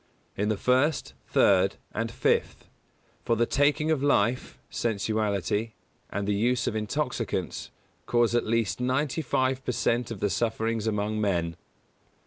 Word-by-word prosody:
In 105 Hz, +2 st, 0 dB
the 110 Hz, -, 0 dB
first, 130 Hz, +8 st, +1 dB
third -, -, +4 dB, 0.2 s
and -, -, -2 dB
fifth; -, -, 0 dB, 0.6 s
for 115 Hz, -, +1 dB
the 120 Hz, +1 st, +2 dB
taking 145 Hz, +4 st, +2 dB
of 155 Hz, -4 st, +1 dB
life, 125 Hz, -4 st, +1 dB
sensuality, 110 Hz, -1 st, -1 dB, 0.4 s
and 100 Hz, 0 st, -3 dB
the 105 Hz, -, +2 dB
use 120 Hz, +5 st, +1 dB
of -, -, -1 dB
intoxicants, 125 Hz, +6 st, -2 dB, 0.4 s
cause 120 Hz, -1 st, +2 dB
at 120 Hz, -, +1 dB
least 115 Hz, -1 st, 0 dB
ninety 130 Hz, +4 st, 0 dB
five 130 Hz, -1 st, 0 dB
per 125 Hz, -, -1 dB
cent 120 Hz, 0 st, 0 dB
of 115 Hz, -4 st, -6 dB
the 105 Hz, 0 st, 0 dB
sufferings 110 Hz, +2 st, -1 dB
among 105 Hz, 0 st, -1 dB
men. 85 Hz, -5 st, 0 dB
115 Hz, 140 wpm, -27 LUFS, 105-125 Hz, 0.6 s, third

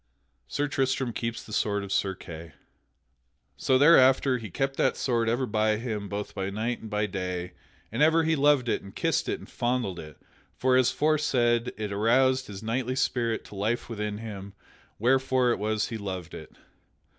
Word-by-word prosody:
[Sidenote: 65 Hz, +1 st, -45 dB
Sir 145 Hz, -, -1 dB
Tristram 135 Hz, -3 st, 0 dB
keeps 115 Hz, 0 st, -4 dB
the 105 Hz, -, -11 dB
sword 100 Hz, -1 st, 0 dB
of 100 Hz, -, -7 dB
Sir 95 Hz, -1 st, 0 dB
Kay] 80 Hz, -2 st, -10 dB, 1.0 s
So 130 Hz, -, +2 dB
thereafter 135 Hz, -3 st, +5 dB
he 110 Hz, -3 st, -7 dB
kept 135 Hz, +9 st, -2 dB
that -, -, +2 dB
sword 115 Hz, -3 st, +1 dB
ever 120 Hz, +3 st, +1 dB
by 110 Hz, -1 st, +1 dB
him 105 Hz, -3 st, -4 dB
both 105 Hz, 0 st, -4 dB
by 95 Hz, 0 st, -3 dB
night 110 Hz, +4 st, -2 dB
and 110 Hz, -, -8 dB
by 105 Hz, 0 st, 0 dB
day, 90 Hz, -2 st, -4 dB, 0.4 s
and 115 Hz, +6 st, -2 dB
ever 160 Hz, +2 st, +5 dB
he 160 Hz, 0 st, +2 dB
loved 145 Hz, -3 st, +3 dB
it -, -, 0 dB
and 100 Hz, -, -13 dB
kissed -, -, 0 dB
it -, -, -1 dB
and -, -, -13 dB
fondled 120 Hz, -7 st, -2 dB
it; 75 Hz, -2 st, -10 dB, 0.4 s
for, 130 Hz, 0 st, +2 dB
as 130 Hz, -1 st, +4 dB
aforesaid, 125 Hz, -6 st, +1 dB
it 105 Hz, -1 st, -4 dB
aroused 130 Hz, +5 st, +3 dB
his 100 Hz, 0 st, -8 dB
knightly 125 Hz, +3 st, -1 dB
spirit 120 Hz, -4 st, 0 dB
to -, -, -12 dB
life 110 Hz, +6 st, -1 dB
within 105 Hz, -2 st, -3 dB
him, 100 Hz, -3 st, -8 dB, 0.4 s
wherefore 130 Hz, +1 st, +2 dB
it 120 Hz, -, -1 dB
was 105 Hz, 0 st, -1 dB
he 115 Hz, -, -5 dB
loved 95 Hz, -4 st, -5 dB
it. 80 Hz, -, -9 dB
115 Hz, 185 wpm, -27 LUFS, 100-130 Hz, 1.0 s, thereafter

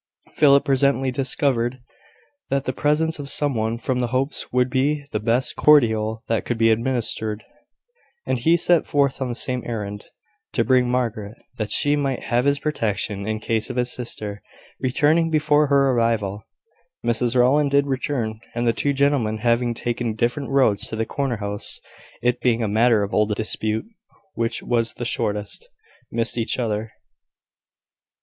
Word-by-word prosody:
Philip 140 Hz, -2 st, +5 dB
presently 135 Hz, -1 st, +2 dB
discovered 130 Hz, -1 st, 0 dB, 0.7 s
that 140 Hz, 0 st, 0 dB
the 130 Hz, -, -2 dB
presence 155 Hz, +3 st, 0 dB
of 140 Hz, -1 st, -4 dB
some 145 Hz, -1 st, +1 dB
one 110 Hz, 0 st, -1 dB
from 125 Hz, +1 st, -2 dB
the 125 Hz, -, 0 dB
Hopes 130 Hz, +4 st, -2 dB
would 125 Hz, 0 st, +2 dB
be 140 Hz, +3 st, 0 dB
the 105 Hz, -, -1 dB
best 120 Hz, +4 st, 0 dB
cordial 110 Hz, -6 st, +3 dB
that 115 Hz, -1 st, 0 dB
could 120 Hz, -, -3 dB
be 115 Hz, 0 st, +4 dB
administered; 110 Hz, -2 st, -1 dB, 0.8 s
and 130 Hz, -, -1 dB
he 165 Hz, +8 st, +3 dB
set 170 Hz, 0 st, +2 dB
forth 140 Hz, -2 st, +1 dB
on 130 Hz, -, -1 dB
the 120 Hz, -, -3 dB
same 125 Hz, 0 st, -1 dB
errand 105 Hz, -3 st, -5 dB, 0.5 s
to 115 Hz, -, +2 dB
bring 125 Hz, +1 st, +3 dB
Margaret, 115 Hz, -4 st, -2 dB, 0.2 s
that 110 Hz, -2 st, -3 dB
she 145 Hz, 0 st, +3 dB
might 135 Hz, -3 st, -2 dB
have 120 Hz, +2 st, 0 dB
his 140 Hz, 0 st, +3 dB
protection 105 Hz, -8 st, -2 dB
in 110 Hz, 0 st, -2 dB
case 110 Hz, 0 st, -1 dB
of -, -, -5 dB
his 125 Hz, 0 st, 0 dB
sister 105 Hz, -4 st, -4 dB, 0.4 s
returning 150 Hz, +6 st, +2 dB
before 150 Hz, -1 st, +3 dB
her 140 Hz, -1 st, +3 dB
arrival. 110 Hz, -4 st, 0 dB, 0.6 s
Mrs 120 Hz, +1 st, +1 dB
Rowland 140 Hz, +4 st, +4 dB
did 140 Hz, 0 st, +3 dB
return: 130 Hz, -5 st, -2 dB, 0.2 s
and 120 Hz, 0 st, 0 dB
the 115 Hz, -, +3 dB
two 140 Hz, +4 st, 0 dB
gentlemen, 135 Hz, -6 st, +1 dB
having 120 Hz, +1 st, +1 dB
taken 120 Hz, -1 st, -2 dB
different 120 Hz, +5 st, -1 dB
roads 130 Hz, -7 st, +2 dB
to -, -, -5 dB
the 110 Hz, 0 st, -1 dB
corner 135 Hz, -3 st, -2 dB
house 100 Hz, 0 st, -4 dB, 0.4 s
(it 125 Hz, 0 st, +1 dB
being 120 Hz, -2 st, +2 dB
a -, -, 0 dB
matter 110 Hz, +1 st, +3 dB
of 100 Hz, -, -5 dB
old 105 Hz, 0 st, +2 dB
dispute 110 Hz, 0 st, -1 dB, 0.5 s
which 115 Hz, 0 st, -2 dB
was 115 Hz, -2 st, 0 dB
the 120 Hz, -, -5 dB
shortest) 105 Hz, -, -2 dB, 0.4 s
missed 115 Hz, +1 st, -1 dB
each 115 Hz, -, 0 dB
other. 110 Hz, -2 st, -2 dB
120 Hz, 165 wpm, -22 LUFS, 110-140 Hz, 0.8 s, Philip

